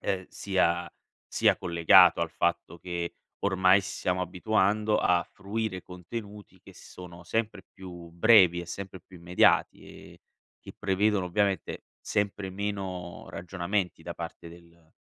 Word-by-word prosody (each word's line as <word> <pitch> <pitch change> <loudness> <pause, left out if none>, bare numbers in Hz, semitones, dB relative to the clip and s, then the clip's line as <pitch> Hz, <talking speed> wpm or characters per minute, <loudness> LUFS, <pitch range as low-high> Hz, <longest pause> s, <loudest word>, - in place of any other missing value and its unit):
ehm, 95 -2 -2
sia 90 -3 0 0.4
sia - - +3
collegato 85 +1 +5
al 85 -1 -1
fatto 85 0 -2
che 85 -1 -5 0.3
ormai 95 0 +4
s 100 +1 -7
siamo 90 0 0
abituando 105 +3 +1
a 90 -1 +3
fruire 100 -1 -4
contenuti 100 +3 -9
che - - -16
sono 90 -1 -12
sempre 110 0 -2
più 90 -3 -10
brevi 85 -1 +5
e 85 - -8
sempre 95 +1 -7
più 95 - -16
immediati 85 +1 +2
e - - -14 0.4
che - - -12
prevedono 100 0 +1
ovviamente 100 +1 -1 0.2
sempre 100 -1 -2
meno 95 -3 -5
ragionamenti 90 0 -3
da 85 +1 -6
parte 85 0 -8
del 85 -1 -18
90 Hz, 130 wpm, -28 LUFS, 85-100 Hz, 0.4 s, collegato